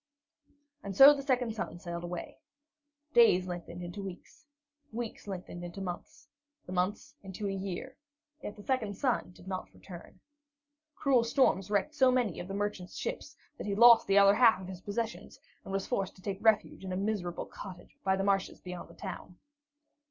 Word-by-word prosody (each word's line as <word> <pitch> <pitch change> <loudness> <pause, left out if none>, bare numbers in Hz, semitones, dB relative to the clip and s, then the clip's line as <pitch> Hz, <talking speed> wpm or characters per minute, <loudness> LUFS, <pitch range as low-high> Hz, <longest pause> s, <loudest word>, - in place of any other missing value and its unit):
And 195 -1 -6
so 275 +2 +11
the 285 - -4
second 250 -4 0
son 215 -5 -5
sailed 170 -1 -6
away. 175 0 -6 0.7
Days 185 -6 +6
lengthened 175 -1 -6
into 175 +4 -6
weeks, 195 - -10 0.4
weeks 230 -2 -6
lengthened 180 -2 -6
into 175 +2 -7
months, 180 -2 -7 0.4
the - - -9
months 185 +3 -1
into 195 +1 -5
a - - -1
year, 195 +7 -5 0.5
yet 205 - -6
the 205 - -12
second 220 -6 -1
son 255 -8 0
did 175 +1 -16
not 185 -1 -5
return. 180 0 -12 0.8
Cruel 260 -4 +3
storms 230 -5 +2
wrecked 210 +9 0
so 265 -4 +5
many 245 -8 +1
of 175 - -6
the 195 - -5
merchant's 205 -3 -3
ships - - -5 0.2
that - - -5
he 200 - -1
lost 235 +1 +8
the 195 - +4
other 200 0 +7
half 225 -1 +5
of 185 - -8
his 185 -1 -8
possessions, 220 +3 -4 0.2
and - - -8
was 195 0 -1
forced 195 -6 -2
to 185 - -17
take 195 -1 -3
refuge 220 -3 +2
in 190 - -5
a 185 - -2
miserable 195 -4 -2
cottage 185 -3 -11
by 190 0 +2
the 195 - -1
marshes 195 -1 0
beyond 180 -1 -8
the - - -15
town. 185 -2 -8
195 Hz, 180 wpm, -31 LUFS, 180-225 Hz, 0.8 s, so